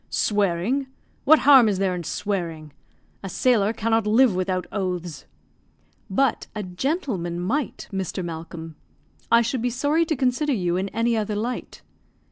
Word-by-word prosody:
"Swearing! 205 +6 0 0.4
What 315 +3 +7
harm 265 -6 +8
is 200 - 0
there 190 -1 0
in 175 -1 -4
swearing? 165 -6 -4 0.5
A 195 - -6
sailor 215 0 +2
cannot 225 -1 0
live 230 +1 +5
without 185 0 -1
oaths." 180 -7 -4 0.8
"But 250 +5 +1
a 210 - -3
gentleman 185 - -2
might, 250 +11 -2
Mr. 190 -2 -3
Malcolm. 165 -1 -7 0.5
I 235 0 +6
should 245 +1 -2
be 245 - 0
sorry 285 +7 +1
to 315 - -1
consider 260 +3 +1
you 180 -6 0
in 190 +2 -1
any 230 +2 0
other 215 -1 -1
light." 235 +4 -4
210 Hz, 145 wpm, -24 LUFS, 180-250 Hz, 0.8 s, harm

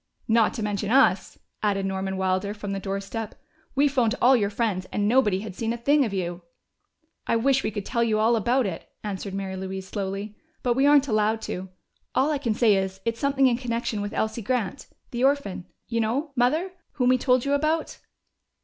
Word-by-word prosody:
"Not 225 -1 +3
to 220 - -3
mention 205 0 -2
us," 265 +4 +3 0.2
added 200 -2 0
Norman 190 0 -2
Wilder 190 +2 0
from 205 -1 -5
the 195 - -2
doorstep. 195 +3 -4 0.4
"We 285 +2 +4
phoned 250 -5 +1
all 255 +2 +6
your 205 -4 +1
friends, 205 -4 -1
and 205 0 0
nobody 210 -5 +3
had 210 -2 -7
seen 225 +4 -2
a - - -4
thing 285 +5 +3
of 225 - -2
you." 175 -2 -3 0.9
"I - - +2
wish 270 +3 +3
we - - 0
could 205 -2 -5
tell 235 -2 0
you 220 -2 +1
all 225 +2 +3
about 240 +4 +2
it," 180 -4 -5
answered 200 -1 -4
Mary 195 -1 -4
Louise 190 0 -5
slowly. 200 +1 -4 0.3
"But 245 - +2
we 270 +3 +3
aren't 285 -1 +5
allowed 215 -1 +1
to. 185 +1 -5 0.5
All 280 +4 +3
I 295 - 0
can 235 -6 -1
say 215 -4 +4
is, 190 0 -2
it's 230 0 -1
something 275 -1 +2
in 245 -2 +3
connection 235 -3 -2
with 205 0 -4
Elsie 220 +2 -1
Grant 245 +1 -2 0.2
the 240 +1 -2
orphan, 270 -10 0 0.2
you 230 -1 0
know, 265 +8 -1
Mother, 305 +10 +1 0.2
whom 250 -3 +2
we 255 0 +4
told 250 0 +2
you 280 - +1
about." 310 +3 0
225 Hz, 205 wpm, -25 LUFS, 195-255 Hz, 0.9 s, all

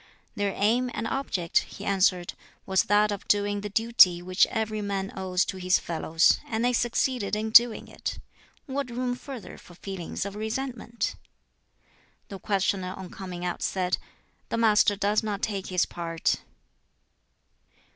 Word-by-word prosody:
"Their 205 -1 -1
aim 240 +5 +2
and - - -3
object," 195 -10 0
he - - -9
answered, 185 -2 +2 0.3
"was 190 -1 +2
that 210 +1 +3
of 200 - -5
doing 205 0 +1
the 210 - -5
duty 205 -5 +5
which 185 +1 +2
every 215 -1 -2
man 195 -1 -3
owes 185 -1 0
to 190 - -5
his 185 0 +3
fellows, 165 0 +2
and 225 +1 -1
they 250 - +2
succeeded 240 -2 0
in 220 +1 -2
doing 235 0 +6
it; - - -5 0.5
what 275 -2 -3
room 245 +1 -2
further 250 -2 -9
for 175 - -16
feelings 190 0 -5
of 200 - -5
resentment?" 235 +1 -3 1.1
The 195 - -7
questioner 190 -2 -1
on 190 -2 -8
coming 180 -2 -6
out 175 - -3
said, 180 -1 0 0.5
"The - - -1
Master 210 -2 +4
does 205 +1 +1
not 210 -2 -4
take 200 -3 -2
his 180 -1 +1
part." 165 -1 -2
205 Hz, 150 wpm, -27 LUFS, 185-225 Hz, 1.1 s, doing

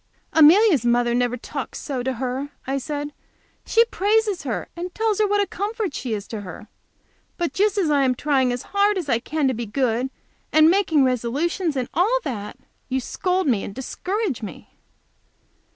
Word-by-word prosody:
"Amelia's 320 - +6
mother 240 0 +2
never 245 0 +1
talks - - -6
so 270 -4 -4
to 260 +1 -1
her!" 260 +3 -3 0.2
I 270 +1 -1
said. 290 +1 -4 0.5
"She 460 +1 +5
praises 425 -2 +1
her, - - -3
and 355 +1 -6
tells 440 -2 0
her 425 - +3
what 410 0 +2
a - - +2
comfort 410 - -3
she 235 -4 -3
is 205 -1 -7
to 220 -2 -5
her. 185 +2 -10 0.7
But 345 -2 -2
just 410 +1 +1
as 345 -6 +2
I 285 -1 +3
am 255 -1 +2
trying 265 -2 +1
as 245 0 -3
hard 405 0 +3
as 340 -6 -4
I 235 - +2
can 295 +3 -1
to 260 - +1
be 235 -1 -4
good, 250 +2 0 0.4
and 310 +1 +6
making 345 -7 +3
resolutions, 280 - 0
and 255 -2 -1
all 420 +9 +3
that, 210 -5 -5 0.3
you 265 0 0
scold 365 +8 -1
me 235 -8 +1
and 195 - -7
discourage 360 - -3
me!" 195 -7 -9
290 Hz, 185 wpm, -23 LUFS, 245-380 Hz, 0.7 s, Amelia's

